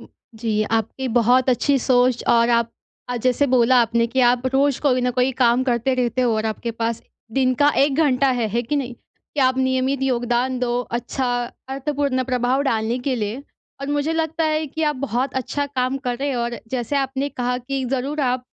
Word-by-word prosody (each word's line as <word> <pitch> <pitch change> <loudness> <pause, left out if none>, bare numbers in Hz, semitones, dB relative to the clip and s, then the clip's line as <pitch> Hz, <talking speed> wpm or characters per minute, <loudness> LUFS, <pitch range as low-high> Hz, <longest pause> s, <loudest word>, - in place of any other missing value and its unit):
जी, 220 -2 -4
आपकी 225 +4 -2
बहुत 245 +3 +4
अच्छी 275 +3 +2
सोच 250 -1 +2
और 235 0 +4
आप 235 -1 +2 0.4
अ, 245 - -2
जैसे 255 +4 +1
बोला 250 0 +4
आपने 230 0 +1
कि 260 +3 -1
आप 245 0 +3
रोज 275 0 +2
कोई 255 -4 +2
न 250 0 +1
कोई 250 +1 +3
काम 245 0 +3
करते 245 +1 +1
रहते 250 0 0
हो, 240 -2 +2
और 220 0 -1
आपके 220 +2 -3
पास 230 0 -3 0.3
दिन 255 0 +2
का 290 - +6 0.2
1 280 -1 0
घंटा 265 0 +2
है, 230 - +1
है 235 +3 -1
कि 290 +5 -2
नहीं? 255 -3 -2
कि 285 - -9
आप 260 0 +3
नियमित 260 +1 0
योगदान 245 0 0
दो 245 0 0 0.2
अच्छा 250 +1 -3 0.4
अर्थपूर्ण 275 -1 -1
प्रभाव 255 +1 0
डालने 230 -2 0
के 255 +1 -1
लिए 220 +5 -3 0.4
और 275 - -4
मुझे 290 +2 0
लगता 325 0 -1
है 310 0 0
कि, 320 +3 -5
आप 300 -2 +1
बहुत 250 +4 -2
अच्छा 285 +3 -3
काम 255 -1 -1
कर 245 -1 0
रहे 280 0 -1
हो, 245 - -1
और 235 0 -3
जैसे 255 +2 -2
आपने 270 +1 -1
कहा 250 -2 -2
कि 265 +1 -3
जरूर 280 +4 -2
आप 255 -2 0
255 Hz, 200 wpm, -21 LUFS, 240-270 Hz, 0.4 s, का